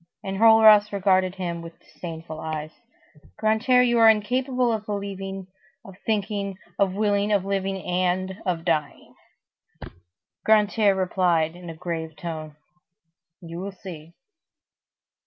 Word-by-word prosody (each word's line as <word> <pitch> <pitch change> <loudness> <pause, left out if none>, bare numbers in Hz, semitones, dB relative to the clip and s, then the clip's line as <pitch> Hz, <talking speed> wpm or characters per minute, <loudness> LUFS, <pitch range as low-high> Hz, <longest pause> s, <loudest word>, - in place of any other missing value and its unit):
Enjolras 215 +1 +6
regarded 190 -2 +2
him 170 -3 -4
with 165 0 -11
disdainful 160 -2 -9
eyes:— 155 -1 -5 0.7
"Grantaire, 225 +4 +3
you 240 -1 +2
are 225 -1 +8
incapable 250 +3 +1
of 215 -1 -3
believing, 195 -2 -5 0.4
of 195 - -12
thinking, 200 -2 -1 0.2
of 190 -2 +2
willing, 205 0 +1
of 200 -2 +2
living, 195 -1 -2
and 185 +2 -1
of 175 -4 -2
dying." 155 -4 -2 1.3
Grantaire 210 -1 +3
replied 175 -3 +1
in 175 -1 -10
a 165 - -7
grave 160 -2 -5
tone:— 155 -3 -7 0.9
"You 170 0 -8
will 195 +1 -5
see." 170 -4 -11
190 Hz, 120 wpm, -24 LUFS, 170-210 Hz, 1.3 s, are